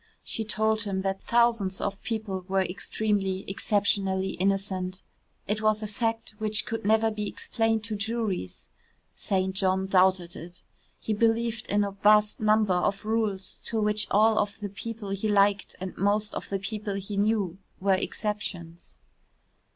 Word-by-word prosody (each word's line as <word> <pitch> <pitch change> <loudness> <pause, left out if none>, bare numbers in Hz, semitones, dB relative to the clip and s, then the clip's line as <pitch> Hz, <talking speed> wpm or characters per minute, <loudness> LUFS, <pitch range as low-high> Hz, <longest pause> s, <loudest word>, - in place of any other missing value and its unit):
She 225 - -3
told 220 0 +1
him 195 -2 -2
that 195 0 -1
thousands 230 -5 +2
of 200 0 -3
people 215 -5 -3
were 190 0 +2
extremely, 195 +1 -1
exceptionally 195 -1 +1
innocent. 190 0 -1 0.4
It 215 +2 0
was 215 0 +2
a - - -2
fact 225 +2 -2
which 215 0 +1
could 225 -1 -4
never 220 +2 +3
be 210 -1 -3
explained 225 +1 0
to 215 0 -2
juries. 200 - -2 0.5
St. 190 -1 0
John 190 0 +2
doubted 185 -2 +3
it. 175 +2 -10 0.4
He 220 - -2
believed 230 +1 +1
in 205 0 +2
a 200 - -2
vast 210 +2 +4
number 215 -2 +3
of 195 +3 0
rules 215 -3 -1
to 225 - -1
which 210 0 +2
all 215 +1 +4
of 205 +1 -1
the 205 -1 -4
people 210 0 -6
he 200 +2 -1
liked 200 -1 +3
and 185 0 -5
most 205 +1 +1
of - - -5
the 195 - 0
people 205 +1 -4
he 195 +1 -4
knew 200 -3 +1 0.2
were 195 0 +3
exceptions. 185 -4 -4
205 Hz, 155 wpm, -27 LUFS, 190-220 Hz, 0.5 s, vast